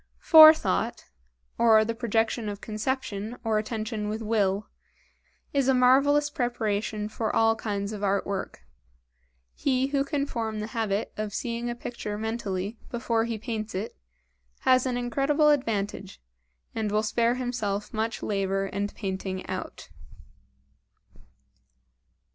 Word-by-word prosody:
Fore 315 -1 +10
thought, 310 - -2 0.5
or 220 -2 +6
the 230 - -2
projection 225 -1 0
of 200 -1 -6
conception 220 0 -3
or 220 -2 +1
attention 215 -1 -3
with 220 +1 -4
will, 210 -2 0 0.9
is 275 -2 +2
a 265 - +4
marvelous 275 +4 +4
preparation 215 -5 -2
for 220 0 -2
all 225 0 +4
kinds 205 -2 -3
of 205 -1 -6
art 200 0 +1
work. 195 -1 -4 0.9
He 265 -1 0
who 275 -1 +1
can 280 -1 -1
form 225 -5 -3
the 210 - -3
habit 220 -3 -1
of 210 -1 -4
seeing 235 0 -3
a 240 - -3
picture 235 -3 -5
mentally 215 -2 -3
before 230 -1 0
he 230 -1 -3
paints 220 -2 -5
it, 200 +4 -4 0.7
has 255 0 +4
an 250 -1 -1
incredible 275 +5 +2
advantage, 210 -8 -1 0.5
and 215 -2 -2
will 210 +1 +1
spare 230 +2 +1
himself 220 -5 -3
much 220 +1 -2
labor 195 -1 0
and 200 +1 -3
painting 190 -2 -4
out. - - -6
225 Hz, 130 wpm, -27 LUFS, 210-245 Hz, 0.9 s, Fore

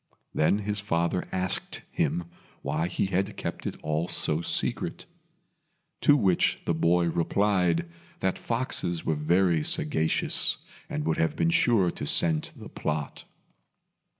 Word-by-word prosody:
Then 80 +6 +3
his 105 0 0
father 85 -2 -1
asked 95 0 -3
him 90 - 0 0.4
why 75 +4 -1
he 90 - -1
had 95 +2 -1
kept - - -4
it - - -5
all 80 +2 -1
so 80 -2 0
secret; - - -1 1.0
to 145 - +6
which 95 -8 +2
the - - +1
boy 85 +2 +2
replied 90 0 +1 0.3
that 95 -1 -1
foxes 115 -8 -1
were 80 - +1
very 85 +2 +2
sagacious, 80 +2 +1 0.3
and 75 - -3
would 80 -1 0
have 80 - +1
been 85 0 +2
sure 100 -4 +3
to - - -6
scent 80 -2 +2
the - - -10
plot. 75 -2 -4
85 Hz, 135 wpm, -27 LUFS, 80-95 Hz, 1.0 s, to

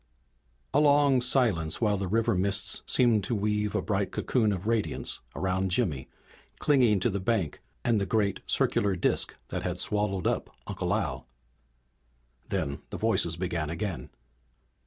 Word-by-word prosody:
A 140 - +4
long 145 -3 +4
silence 115 - +2
while 105 -3 +2
the 95 -1 -3
river 110 +4 +1
mists 95 +1 +1
seemed 115 -5 +3
to 115 - -1
weave 105 0 -1
a - - 0
bright 95 -2 -1
cocoon 110 -5 +1
of 95 -1 -4
radiance 115 -1 -1 0.2
about 95 0 0
Jimmy 90 - 0 0.5
clinging 125 -9 +3
to 115 - +1
the 100 - -2
bank, 95 -6 -1 0.2
and 115 -4 +2
the 100 - -1
great 105 -3 0
circular 100 -2 +1
disk 90 - +1
that - - -3
had - - -3
swallowed 105 -3 0
up - - -1 0.2
Uncle - - -3
Al. 65 -1 -3 1.2
Then 70 0 -2
the - - -5
voices 85 -1 +1
began 85 -4 -2
again. 85 -6 -4
100 Hz, 150 wpm, -28 LUFS, 90-115 Hz, 1.2 s, A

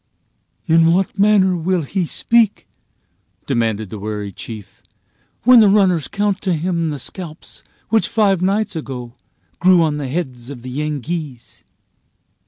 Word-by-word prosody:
"In 165 -1 +4
what 195 +2 -1
manner 200 -3 +4
will 175 0 0
he 175 +4 -2
speak," 230 +2 +1 0.8
demanded 110 -6 -1
the 110 - -6
wary 105 0 -5
chief, 105 0 -9 0.6
"when 250 0 +7
the 215 - +6
runners 190 -6 +3
count 205 -1 -1
to 185 -3 0
him 170 0 -1
the 150 - -4
scalps 160 +4 -8 0.3
which 225 -1 +2
five 205 -5 +2
nights 200 +2 0
ago 125 -6 -6 0.5
grew 180 -1 +5
on 150 -2 0
the 145 -2 -4
heads 130 -6 -4
of 125 -4 -9
the 130 - -7
Yengeese?" 150 -2 -5
165 Hz, 140 wpm, -19 LUFS, 130-190 Hz, 0.8 s, when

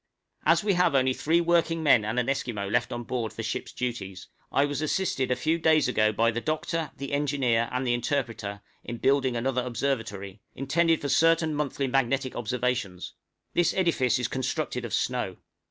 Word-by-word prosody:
As - - +4
we 205 -2 +2
have 180 -5 +2
only 130 -1 +3
three 160 +6 +2
working 165 -1 +2
men 125 -7 +5
and 110 +3 -3
an 125 - +1
Esquimaux 120 -7 -2
left - - +1
on 120 0 -4
board 120 -2 -3
for 115 - -6
ship's 110 - -4
duties, 95 -7 -5 0.2
I 140 - +3
was 145 +1 -3
assisted 155 -5 0
a 125 - +2
few 160 +5 0
days 155 -3 +4
ago 110 -4 +2
by 115 +2 +2
the 120 +1 -3
doctor, 155 +1 -2
the 140 0 -6
engineer, 135 -5 +1
and 125 +1 -1
the 120 - +2
interpreter, 115 -5 -2 0.2
in 120 - -6
building 130 -1 +2
another 125 +2 0
observatory, 115 -6 -3
intended 165 +5 +1
for 145 - -2
certain 165 0 +3
monthly 145 -2 -1
magnetic 135 0 0
observations. 120 -5 -2 0.4
This 175 - +2
edifice 140 - +2
is 125 - -1
constructed 130 -1 -2
of 115 - -6
snow. 120 -8 -1
130 Hz, 180 wpm, -27 LUFS, 115-150 Hz, 0.4 s, men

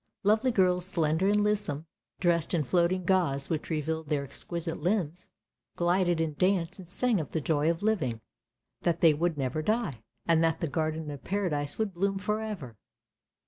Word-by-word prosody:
Lovely 215 +5 +3
girls, 180 -5 +3
slender 165 0 +1
and 205 +1 +3
lissom, 205 -8 -1 0.3
dressed 170 -1 +2
in 160 - +1
floating 175 +4 +1
gauze 170 -7 +1
which 155 -2 -2
revealed 160 -1 -2
their 145 -2 +1
exquisite 170 +4 -4
limbs, 175 -2 -1 0.5
glided 175 -1 +2
in 165 -1 0
the - - -15
dance, 185 -1 +1
and 180 -3 -11
sang 235 +2 +1
of 155 - -8
the 160 - +1
joy 155 +1 +1
of 170 +3 -1
living 180 - 0 0.3
— - - -57
that 170 -1 0
they 165 -2 +7
would 165 +1 0
never 135 +2 -1
die 215 - -1
— - - -49
and 165 -1 +4
that 165 0 +2
the 165 - -1
Garden 155 +1 -2
of 145 - -8
Paradise 170 -8 -1
would 215 -3 -1
bloom 195 +2 0
for 210 +2 -1
ever. 170 - -6
170 Hz, 185 wpm, -29 LUFS, 155-190 Hz, 0.5 s, they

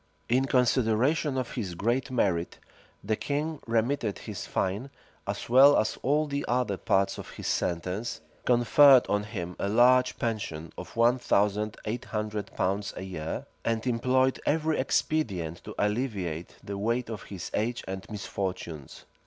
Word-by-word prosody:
In 130 +3 +2
consideration 130 +3 +2
of 130 -2 -2
his 100 -8 -4
great 120 +8 0
merit, 95 -9 0 0.5
the 110 +2 0
king 150 +5 -2
remitted 115 -1 0
his - - -7
fine, 100 +8 -1 0.4
as - - -3
well 135 +4 +7
as 110 - +1
all 150 +3 +2
the 140 -1 -3
other 120 -4 +1
parts 95 +1 +1
of - - -8
his - - -9
sentence, 90 +6 -2 0.2
conferred 125 +2 +6
on 105 0 +1
him 90 -5 -5
a 100 - -1
large 125 +3 +4
pension 85 -9 -3
of - - -9
one 120 +2 +4
thousand 105 -1 +1
eight 115 +3 -3
hundred 105 -1 -3
pounds 100 +2 -1
a - - -5
year, 85 -4 -5 0.2
and 115 0 -1
employed 130 +2 +2
every 155 +1 +1
expedient 95 - -1
to - - -8
alleviate 105 -7 -2
the 100 0 -5
weight 115 +4 0
of 110 - -5
his 95 -4 -7
age 120 +3 -1
and 95 0 -6
misfortunes. 95 -8 -5
110 Hz, 150 wpm, -28 LUFS, 100-130 Hz, 0.5 s, well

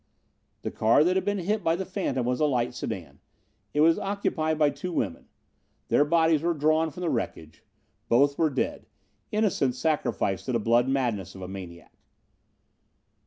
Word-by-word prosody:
The - - -3
car 115 +7 +4
that 180 +3 +2
had 190 -1 0
been 205 0 0
hit 200 +3 -1
by 165 -1 +2
the 190 +2 -4
phantom 185 - -2
was 125 0 0
a 155 - +3
light 125 -3 0
sedan. 75 -7 -6 0.5
It 150 - +1
was 165 +1 +5
occupied 180 -6 -1
by 150 -2 +3
two 160 +6 -6
women. 95 - -3 0.6
Their - - +4
bodies 160 0 +3
were 170 0 0
drawn 155 +2 +2
from 180 - -10
the 175 - 0
wreckage. 80 -9 -4 0.5
Both 140 +4 +4
were 160 +1 +2
dead 135 -2 -3 0.4
innocents 185 - +1
sacrificed 125 - -1
to 130 - -1
the 115 - +2
blood 120 +3 +3
madness 120 -10 -1
of 95 - -8
a - - -5
maniac. 90 -3 -9
145 Hz, 170 wpm, -27 LUFS, 120-165 Hz, 0.6 s, was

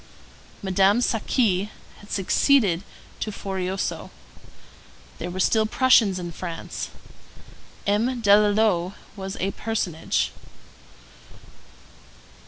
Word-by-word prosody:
Madame 195 +2 +3
Saqui 215 -4 +1 0.3
had 205 - -15
succeeded 195 -2 +3 0.4
to 215 - -3
Forioso. 190 -1 -3 1.1
There 175 - -4
were 185 +1 -5
still 220 +3 +3
Prussians 225 -6 +4
in 175 -1 -5
France. 170 0 -6 1.0
M. 230 +5 +1
Delalot 205 -3 +3 0.2
was 190 -1 -6
a 195 +2 0
personage. 205 -8 -1
200 Hz, 80 wpm, -24 LUFS, 185-220 Hz, 1.1 s, Prussians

